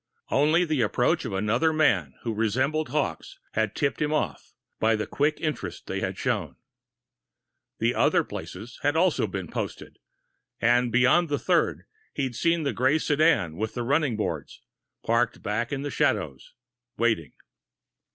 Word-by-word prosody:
Only 155 +5 +3
the 155 -5 0
approach 110 - +1
of - - -4
another 110 +11 +2
man 100 - +2
who 115 - -2
resembled 130 +8 0
Hawkes 135 - -2
had 110 -1 -1
tipped 140 0 -1
him 150 0 +1
off, 120 - -2 0.2
by 110 0 +3
the 110 - -2
quick 150 +2 0
interest 155 -2 -4
they - - -3
had - - -3
shown. - - -2 1.2
The - - +1
other - - +3
places 110 +6 -8
had 145 +1 +1
also 175 0 +2
been - - -5
posted - - -6 0.6
and 120 +1 +3
beyond 130 +8 +4
the 145 - +1
third, - - +1 0.3
he'd 130 -4 -2
seen 170 +2 +1
the 140 - -1
gray 130 +4 +3
sedan 145 - +2
with 110 +2 -3
the 120 - -2
running 140 -2 +1
boards, 110 - -4 0.4
parked 115 0 +1
back 110 +3 -2
in 140 -1 -2
the 145 - -3
shadows, 65 - -1 0.4
waiting. 110 - 0
125 Hz, 150 wpm, -26 LUFS, 110-150 Hz, 1.2 s, beyond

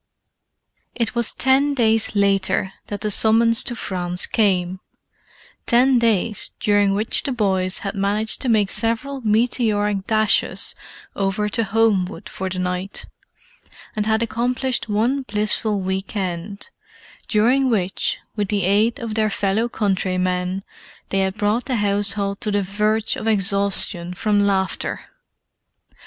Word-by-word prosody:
It 230 -2 -1
was 235 -2 +3
ten 275 +2 +3
days 225 -3 +2
later 195 -1 +1
that 205 -1 -5
the 210 0 -1
summons 225 +2 +4
to 240 - -3
France 180 -4 -1
came—ten 210 +6 -1
days 220 -2 0
during 205 -1 +2
which 215 +2 0
the 275 - -3
boys 190 -6 0
had 195 - -2
managed 205 +2 0
to 260 - -1
make 210 -3 +2
several 235 +4 -1
meteoric 210 -3 0
dashes 215 -1 +1 0.4
over 200 +2 -1
to 230 +2 0
Homewood 210 -2 0
for 190 0 -4
the 185 - -4
night, 180 +1 -3 0.9
and 210 0 -1
had 220 +1 +2
accomplished 245 +2 -1
one 235 +7 +1
blissful 210 -2 0
week 190 +2 -3
end, 190 - -4 0.6
during 250 +5 +2
which, 195 -5 0 0.2
with 205 -2 -1
the 200 -1 0
aid 210 +5 +2
of 230 -2 -5
their 215 0 +1
fellow 205 +3 0
countrymen, 185 -2 -1 0.5
they 195 - 0
had 190 +1 -1
brought 210 +4 0
the 260 - -1
household 200 -1 0
to 215 - -1
the 205 -1 0
verge 210 +3 0
of 220 - -5
exhaustion 195 -3 +1
from 210 +1 +1
laughter. 195 -2 0
210 Hz, 130 wpm, -21 LUFS, 195-225 Hz, 0.9 s, summons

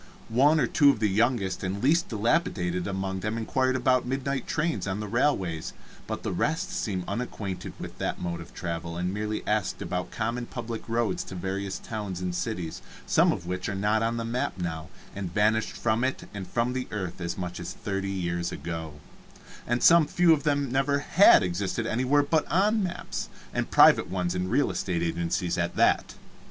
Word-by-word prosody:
One 140 +7 +4
or 130 - +3
two 140 +4 +5
of 140 - +2
the 110 - +2
youngest 105 -2 +1
and 95 +2 -2
least 165 +6 +3
dilapidated 100 - 0
among 95 -1 -2
them 105 +4 -2
inquired 130 +3 +1
about 130 0 +3
midnight 135 +1 -2
trains 160 -6 -1
on 95 +1 -2
the 105 - -4
railways, 100 - 0 0.3
but - - -4
the - - -2
rest 160 - -1
seemed 105 - -2
unacquainted 105 -6 -4
with - - -8
that - - -2
mode 85 -1 -3
of 85 - -11
travel, 85 -1 -4
and 90 +2 -1
merely 105 +1 -3
asked - - 0
about 90 0 -3
common 115 +2 -3
public 115 -2 -6
roads 115 -4 0
to 95 - -8
various 95 +2 -3
towns 105 -5 -5
and 90 -1 -2
cities, 90 -3 -3 0.2
some - - +4
of 85 - -4
which 90 +1 -3
are 100 - -2
not 105 +2 +1
on 115 +1 0
the 115 - -2
map 115 -4 -2
now, 80 -3 -4 0.3
and 95 -3 -4
vanished 110 +1 +2
from 115 +1 0
it 130 0 -2
and 100 -3 -6
from 120 +5 0
the 130 0 -3
earth 95 -4 -5
as 85 0 -3
much 90 -1 -4
as - - -5
thirty 95 -1 -3
years 85 -2 -2
ago, 80 -2 -5 0.7
and 120 +1 0
some 165 -2 +7
few 170 +2 +5
of 150 - 0
them 145 -3 0
never 135 +2 +2
had 165 - +6
existed 95 +5 -2
anywhere 130 +6 +2
but 155 +1 +1
on 210 +5 +3
maps, 180 -3 -4 0.2
and - - -1
private - - +6
ones 90 -2 -1
in 90 0 -2
real 135 +7 +2
estate 85 -3 -1
agencies 85 +1 -1
at - - -1
that. - - +2
105 Hz, 190 wpm, -27 LUFS, 90-130 Hz, 0.7 s, some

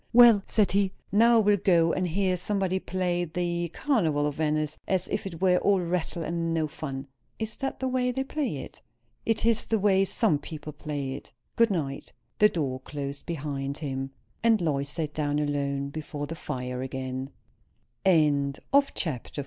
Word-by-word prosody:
"Well," 235 -4 +8
said 210 -4 +2
he, 195 0 +2 0.2
"now 230 +3 +6
I - - +6
will 205 -1 +4
go 170 -3 +3
and 185 -1 0
hear 185 +2 +1
somebody 190 0 -1
play 180 -1 -1
the 175 0 -2
'Carnival 165 - +1
of 150 - 0
Venice,' 155 0 -1
as 185 -2 +1
if - - -2
it 170 -4 -8
were 180 -1 +5
all 200 -1 +3
rattle 170 -1 -2
and 165 0 -1
no 160 -1 +1
fun." 135 -3 -6 0.3
"Is 220 -1 -2
that 270 -1 -3
the 260 - -1
way 255 -1 +1
they 265 +1 -1
play 275 - -2
it?" - - -13 0.5
"It 225 -1 +1
is 230 -1 +3
the 225 - +2
way 195 -1 +4
some 155 -5 +1
people 150 -1 -8
play 145 -2 -4
it. 135 - -9 0.2
Good 230 0 +4
night." 145 -8 -3 0.3
The 210 - +7
door 135 -8 -2
closed 140 +2 -6
after 140 -2 -3
him, 135 -1 -3 0.3
and 230 -2 +4
Lois 140 -5 0
sat 150 -1 -3
down 145 -1 0
alone 140 -1 -1
before 150 0 -5
the 155 - -6
fire 125 -5 -4
again. 130 0 -4 0.7
CHAPTER 150 -6 +3
XLIV. 180 - +1
165 Hz, 175 wpm, -27 LUFS, 145-195 Hz, 0.7 s, Well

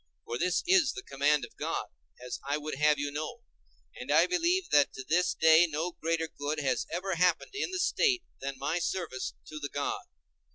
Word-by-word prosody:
For 120 +1 -4
this 180 0 +1
is 365 -2 +4
the 390 - -7
command 145 - +1
of - - -18
God, - - -2 0.3
as 125 0 -6
I 140 +2 -1
would 150 +1 -5
have 150 +2 +3
you 145 0 -2
know; 155 +12 -5 0.5
and - - -5
I - - +6
believe 360 +1 +1
that 145 -1 +5
to 130 - -7
this 175 +3 +2
day 160 +2 +6
no 160 +4 -2
greater 165 0 -1
good 150 0 -4
has 140 -2 0
ever 185 +3 -2
happened 180 - +2
in 415 - -2
the 375 - -3
State 370 0 +2 0.2
than 135 0 -5
my 150 +6 -1
service 170 -7 -3
to 155 - -8
the 145 -1 -4
God. 145 +1 -2
160 Hz, 200 wpm, -30 LUFS, 145-190 Hz, 0.5 s, I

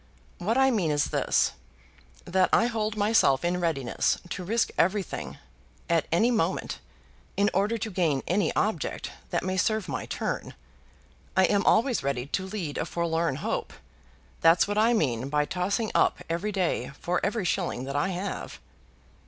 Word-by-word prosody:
What 220 +7 0
I 265 0 +5
mean 195 -9 +1
is 145 -1 +1
this, - - +2 0.7
that 185 0 +2
I - - +4
hold 220 -2 -1
myself 205 -10 +3
in 180 +1 0
readiness 145 -7 0
to 185 - -4
risk 225 +6 0
everything 190 +1 -1 0.5
at 165 -2 +1
any 220 +9 +3
moment, 225 - -1 0.6
in 200 +1 +3
order 205 +5 +1
to 220 0 -4
gain 160 -7 +1
any 195 +4 +1
object 195 -9 -1 0.2
that - - -1
may 185 0 -1
serve 215 +1 +1
my - - -4
turn. - - -3 0.8
I 190 - +6
am 200 +1 +2
always 240 +2 +3
ready 135 -2 -2
to 190 +6 -3
lead 185 -8 -4
a - - -1
forlorn 165 -3 0
hope. - - -2 0.7
That's 165 +3 +5
what 205 +1 0
I 230 +2 +4
mean 130 - 0
by 150 0 +1
tossing 195 +7 -1
up - - +3
every 170 +6 -2
day 180 -10 -1
for 180 +1 -1
every 210 -1 0
shilling 170 -8 -1
that 135 +1 -5
I 145 +4 +1
have." 190 +2 -5
185 Hz, 160 wpm, -27 LUFS, 165-210 Hz, 0.8 s, I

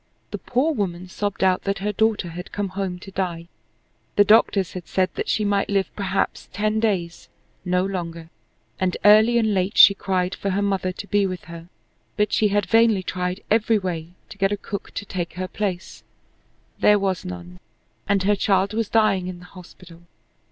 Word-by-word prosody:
The - - -4
poor 270 +6 0
woman 185 -6 -3
sobbed 205 +1 -3
out 185 -1 +3
that 195 0 0
her 205 +2 -2
daughter 215 -3 0
had 175 +2 -8
come 205 -1 -3
home 190 -1 -4
to 195 +2 -12
die. 175 -3 -3 0.7
The 205 - +6
doctors 205 -3 +3
had 180 -2 -7
said 185 -1 0
that - - -4
she 215 - +1
might 200 -1 0
live 195 -1 -1
perhaps 195 -1 -2
ten 215 +3 0
days, 185 -7 -2 0.3
no 180 0 +1
longer, 170 -3 -5 0.5
and 185 -1 0
early 215 +3 +6
and 220 -2 +2
late 190 +2 -1
she 200 - +9
cried 185 -1 -1
for 200 - -3
her 195 +1 0
mother 195 -2 0
to 185 - -8
be 205 -1 +1
with 185 -1 -6
her. 170 +1 -11 0.5
But 210 -1 +1
she 215 - +3
had 205 0 +1
vainly 225 -4 +3
tried 180 +1 -3
every 220 0 +3
way 175 -4 -4 0.2
to 200 - -12
get 195 0 +2
a 205 - -1
cook 200 0 -6
to 205 - -4
take 175 -3 -4
her 185 0 -4
place 190 -3 -4 0.8
there 210 - +5
was 190 -3 -1
none, 90 0 -8 0.5
and 200 -2 +2
her 205 +2 +3
child 195 0 +1
was 225 -1 -1
dying 205 -5 +2
in 185 -1 -6
the 180 - -14
hospital. 180 -2 -14
195 Hz, 190 wpm, -23 LUFS, 180-205 Hz, 0.8 s, she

